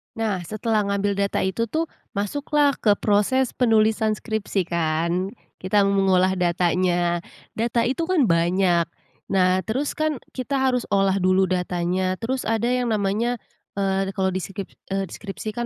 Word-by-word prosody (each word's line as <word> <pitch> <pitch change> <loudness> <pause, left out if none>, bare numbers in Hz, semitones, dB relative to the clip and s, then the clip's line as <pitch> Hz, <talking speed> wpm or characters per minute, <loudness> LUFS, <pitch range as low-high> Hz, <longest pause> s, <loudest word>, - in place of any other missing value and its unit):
Nah, 205 -6 -2
setelah 215 +1 0
ngambil 200 0 0
data 200 0 0
itu 210 +5 0
tuh, 320 +7 -2 0.2
masuklah 285 +7 +1
ke 210 - +4
proses 225 +5 +2
penulisan 220 -2 +2
skripsi 215 -2 -2
kan, 170 +3 0 0.2
kita 195 +2 +2
mengolah 190 -2 +3
datanya, 175 0 +1 0.4
data 235 +1 +1
itu 270 +8 0
kan 330 - +2
banyak. 170 0 +3 0.5
Nah, 185 0 +3
terus 265 +6 -2
kan 310 -3 -1
kita 260 +2 -5
harus 255 -2 +1
olah 195 -1 +3
dulu 185 0 +3
datanya, 180 0 0
terus 255 +3 -2
ada 225 +2 +1
yang 250 -2 +1
namanya 215 +4 0 0.3
eee, 195 0 -1
kalau 190 -1 0
di 185 - -2
skrip 195 +1 -6 0.2
eee, 195 -2 -1
di - - -10
skripsi 215 +1 -6
kan 240 +3 -3
200 Hz, 150 wpm, -23 LUFS, 185-230 Hz, 0.5 s, ke